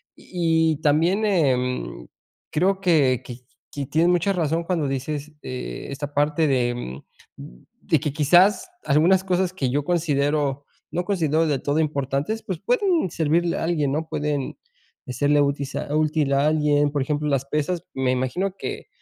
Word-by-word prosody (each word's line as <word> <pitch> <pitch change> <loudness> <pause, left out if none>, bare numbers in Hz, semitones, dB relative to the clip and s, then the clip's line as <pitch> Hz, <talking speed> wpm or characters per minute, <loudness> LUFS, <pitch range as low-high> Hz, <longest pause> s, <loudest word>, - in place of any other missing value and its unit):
Y 165 -2 +1
y - - -5
también, 165 +8 +2
em, 125 - 0 0.4
creo 190 +5 +1
que 145 -9 +3
que 120 -1 -8 0.3
que 140 -1 -4
tienes 165 +3 +2
mucha 180 +2 +2
razón 165 -2 0
cuando 165 -5 0
dices, 145 +3 -4
eh, 125 0 -6
esta 145 +1 -6
parte 150 +2 +2
de, 125 -3 +2
em, 70 - -6 0.4
de - - -4
que 145 - -3
quizás 175 - +4 0.2
algunas 170 +6 +4
cosas 185 -1 0
que 135 -8 -1
yo 140 +3 0
considero 145 -4 0 0.3
no 175 +2 -1
considero 165 -5 +1
del 140 -4 0
todo 145 +2 0
importantes, 145 +7 -1
pues, 185 -5 -4
pueden 250 - +1
servirle 165 +2 +1
a - - -2
alguien, 150 -5 0
¿no?, 160 +1 -2
pueden 145 -2 -2 0.5
hacerle 145 +3 +2
útil 140 -1 -1
a 145 - -3
útil 155 -2 +1
a 140 +2 +3
alguien, 150 -2 +2
por 145 - -1
ejemplo, 150 +2 -1
las 135 -1 0
pesas, 150 +4 -2
me 130 -1 0
imagino 130 +10 -1
que, - - -6
150 Hz, 160 wpm, -23 LUFS, 140-170 Hz, 0.5 s, quizás